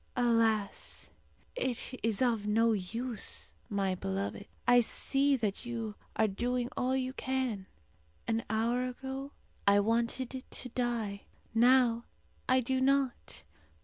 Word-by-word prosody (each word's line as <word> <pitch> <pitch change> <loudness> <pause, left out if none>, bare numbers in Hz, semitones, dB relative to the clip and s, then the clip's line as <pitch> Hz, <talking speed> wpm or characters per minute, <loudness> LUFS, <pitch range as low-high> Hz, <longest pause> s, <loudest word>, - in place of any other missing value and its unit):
"Alas! 230 -4 +1 0.4
it 260 - -2
is 225 +1 +1
of 225 -4 +1
no 225 +2 +4
use, 225 +4 -2 0.2
my 195 -2 +1
beloved. 100 - -3 0.2
I 245 0 +7
see 275 +4 +2
that 215 -6 -2
you 230 -3 -4 0.2
are 220 - +3
doing 245 +4 -1
all 255 +1 +1
you 260 0 -1
can. 260 -8 -2 0.6
An 225 0 +1
hour 230 +3 +1
ago 265 +2 -5 0.4
I 200 0 +7
wanted 235 +4 0
to 250 - -7
die; 230 -5 -2 0.3
now 235 0 +5 0.4
I 255 0 +5
do 260 +2 0
not. 270 -1 +1
235 Hz, 120 wpm, -32 LUFS, 215-255 Hz, 0.6 s, I